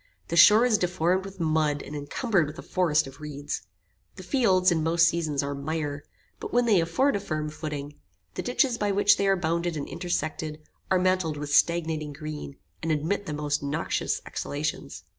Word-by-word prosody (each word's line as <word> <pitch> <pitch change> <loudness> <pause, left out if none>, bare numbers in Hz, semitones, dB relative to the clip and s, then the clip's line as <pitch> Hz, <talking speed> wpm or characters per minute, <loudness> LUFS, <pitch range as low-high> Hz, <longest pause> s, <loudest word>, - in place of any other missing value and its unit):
The 170 - -1
shore 210 +7 +8
is 220 -5 +3
deformed 180 +1 +1
with 195 -1 -10
mud, 155 -3 +1
and 150 - -8
incumbered 170 - 0
with 150 +2 -9
a - - -8
forest 160 -5 +1
of 135 +2 -12
reeds. 145 -8 -5 0.5
The 185 - -10
fields, 185 -6 +3
in 165 -2 +1
most 165 +1 +4
seasons, 155 -5 0
are 140 0 -3
mire; 145 0 -3 0.4
but - - -6
when 245 0 +3
they 205 -7 +4
afford 230 +12 +1
a - - 0
firm 155 -5 -3
footing, 150 -2 -5 0.4
the - - -3
ditches 245 -1 +1
by 205 -1 +1
which 205 +1 +4
they 200 - +1
are 195 - +4
bounded 170 -1 -1
and 145 - -4
intersected, 155 -3 -3 0.3
are 190 - +4
mantled 185 -4 +1
with 145 0 -4
stagnating 160 -2 +2
green, 150 -1 -7 0.2
and 165 - -1
emit 165 +7 -1
the 150 - -3
most 150 0 -1
noxious 145 +3 -2
exhalations. 145 - -4
160 Hz, 185 wpm, -26 LUFS, 150-185 Hz, 0.5 s, shore